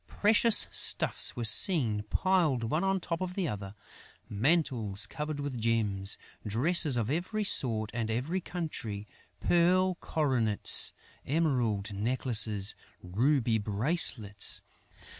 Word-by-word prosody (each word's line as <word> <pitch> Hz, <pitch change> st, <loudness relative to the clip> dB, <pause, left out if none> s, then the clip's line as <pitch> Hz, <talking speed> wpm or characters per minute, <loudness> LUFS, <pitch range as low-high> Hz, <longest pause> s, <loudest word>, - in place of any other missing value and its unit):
Precious 220 Hz, +2 st, +4 dB
stuffs -, -, +2 dB
were 120 Hz, -, -5 dB
seen 115 Hz, -, +3 dB
piled 170 Hz, -10 st, 0 dB
one 155 Hz, +10 st, -2 dB
on 195 Hz, 0 st, 0 dB
the -, -, -2 dB
top 170 Hz, 0 st, -5 dB
of 180 Hz, -1 st, -5 dB
the 190 Hz, -4 st, -2 dB
other: 100 Hz, -4 st, -7 dB, 0.5 s
mantles 115 Hz, -, -1 dB
covered 150 Hz, -1 st, -6 dB
with 140 Hz, -5 st, -5 dB
gems, 105 Hz, -4 st, -1 dB, 0.3 s
dresses 140 Hz, -, +2 dB
of 115 Hz, +1 st, -2 dB
every 185 Hz, +7 st, -3 dB
sort 110 Hz, -, +1 dB
and 115 Hz, -2 st, -4 dB
every 140 Hz, +12 st, -3 dB
country, 135 Hz, -, -6 dB, 0.4 s
pearl 185 Hz, +2 st, +2 dB
coronets, 130 Hz, -9 st, +2 dB, 0.3 s
emerald 125 Hz, -9 st, -1 dB
necklaces, 110 Hz, -2 st, +1 dB, 0.3 s
ruby 115 Hz, +4 st, 0 dB
bracelets.... 105 Hz, -, +1 dB
125 Hz, 115 wpm, -29 LUFS, 110-170 Hz, 0.5 s, Precious